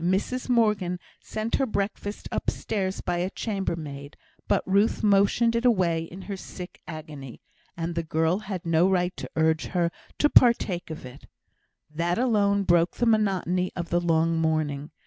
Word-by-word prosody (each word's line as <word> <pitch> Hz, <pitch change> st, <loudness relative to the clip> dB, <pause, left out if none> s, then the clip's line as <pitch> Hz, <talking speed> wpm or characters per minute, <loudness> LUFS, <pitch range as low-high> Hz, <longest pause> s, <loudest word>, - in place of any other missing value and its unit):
Mrs 195 Hz, +9 st, -1 dB
Morgan 210 Hz, -7 st, +2 dB, 0.2 s
sent 220 Hz, +1 st, -2 dB
her 270 Hz, -, +1 dB
breakfast 205 Hz, -1 st, -3 dB
upstairs 195 Hz, -3 st, -2 dB
by 175 Hz, -1 st, -1 dB
a 180 Hz, +2 st, -1 dB
chambermaid, 165 Hz, -10 st, -4 dB, 0.3 s
but -, -, +2 dB
Ruth 200 Hz, +4 st, +2 dB
motioned 210 Hz, +3 st, +3 dB
it 230 Hz, -, 0 dB
away 180 Hz, -9 st, +2 dB
in 185 Hz, +3 st, -10 dB
her 200 Hz, -, -5 dB
sick 180 Hz, -1 st, -9 dB
agony, 150 Hz, -5 st, -8 dB, 0.4 s
and 170 Hz, 0 st, -2 dB
the 170 Hz, -, -1 dB
girl 160 Hz, +3 st, +1 dB
had 195 Hz, -5 st, -6 dB
no 165 Hz, +2 st, +3 dB
right 180 Hz, -1 st, +1 dB
to -, -, -7 dB
urge 160 Hz, 0 st, +2 dB
her 175 Hz, -2 st, 0 dB, 0.3 s
to 295 Hz, -, +4 dB
partake 225 Hz, -, +4 dB
of 155 Hz, -4 st, -7 dB
it. 125 Hz, +2 st, -12 dB, 0.7 s
That 170 Hz, +3 st, 0 dB
alone 205 Hz, -5 st, +2 dB
broke 175 Hz, -2 st, +3 dB
the 240 Hz, -, 0 dB
monotony 190 Hz, -5 st, +1 dB
of 170 Hz, -2 st, -4 dB
the 175 Hz, 0 st, +2 dB
long 165 Hz, -1 st, +2 dB
morning. 155 Hz, -2 st, 0 dB
180 Hz, 160 wpm, -26 LUFS, 165-205 Hz, 0.7 s, to